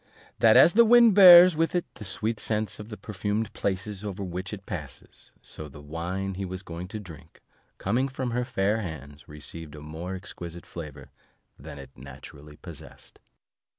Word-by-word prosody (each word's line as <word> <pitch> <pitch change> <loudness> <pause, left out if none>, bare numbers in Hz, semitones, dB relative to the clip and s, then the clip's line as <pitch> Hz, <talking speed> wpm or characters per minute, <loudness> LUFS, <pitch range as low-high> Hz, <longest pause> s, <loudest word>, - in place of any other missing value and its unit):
That 110 -1 +6
as 170 - +7
the 235 +2 +7
wind 235 -1 +6
bears 180 -3 +9
with 165 +3 0
it 175 - 0
the 115 - -11
sweet 110 +3 -2
scents 110 -3 -2
of 105 +1 -9
the 105 - -8
purfumed 105 +2 -3
places 100 +1 -3
over 100 -1 -5
which 90 +1 -5
it 100 -2 -8
passes, 75 -8 -9
so 75 - -8
the 75 0 -13
wine 85 +6 -4
he 95 +1 -5
was 95 0 -6
going 85 0 -7
to 105 +3 -7
drink, 80 -5 -13 0.4
coming 120 +7 0
from 130 -2 -4
her 125 +1 -1
fair 110 -3 -1
hands, 75 - -9
received 75 +1 -7
a - - -10
more 80 +5 -7
exquisite 85 -2 -8
flavour 75 -5 -10 0.5
than - - -10
it 70 -1 -11
naturally 70 +3 -12
possessed. - - -12
95 Hz, 175 wpm, -26 LUFS, 80-110 Hz, 0.5 s, bears